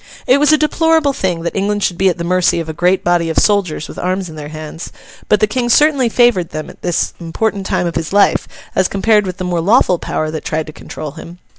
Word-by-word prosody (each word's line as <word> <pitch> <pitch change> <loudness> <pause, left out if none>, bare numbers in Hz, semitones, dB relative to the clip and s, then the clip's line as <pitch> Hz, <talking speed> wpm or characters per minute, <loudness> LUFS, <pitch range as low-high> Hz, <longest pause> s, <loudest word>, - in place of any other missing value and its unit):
It 260 +3 +4
was 295 +1 +4
a 310 - +5
deplorable 315 -1 +2
thing 180 -8 -2
that 170 - -4
England 205 +1 -1
should 175 - -1
be 190 0 +4
at 180 - -2
the 170 - -4
mercy 180 0 +1
of 165 - -4
a 160 - -4
great 180 +3 +1
body 175 -1 +1
of 160 - -4
soldiers 195 -8 +1
with - - -9
arms 185 0 -2
in 160 - -10
their 150 -1 -7
hands; 155 +1 -8 0.4
but 210 - +3
the - - +6
King 240 +3 -2
certainly 280 -1 +4
favoured 230 -8 +2
them 155 0 -6
at - - -20
this 175 -2 -1
important 195 +3 -2
time 185 -3 0
of 170 - -2
his 165 -1 -3
life, 200 +1 +3 0.3
as 190 - +2
compared 210 0 +2
with 185 - -5
the 185 - -4
more 175 -2 -1
lawful 185 -2 +3
power 155 0 -3
that 155 - -5
tried 160 0 -2
to 155 - -10
control 150 -1 -8
him. 170 +3 -11
185 Hz, 250 wpm, -16 LUFS, 165-210 Hz, 0.4 s, the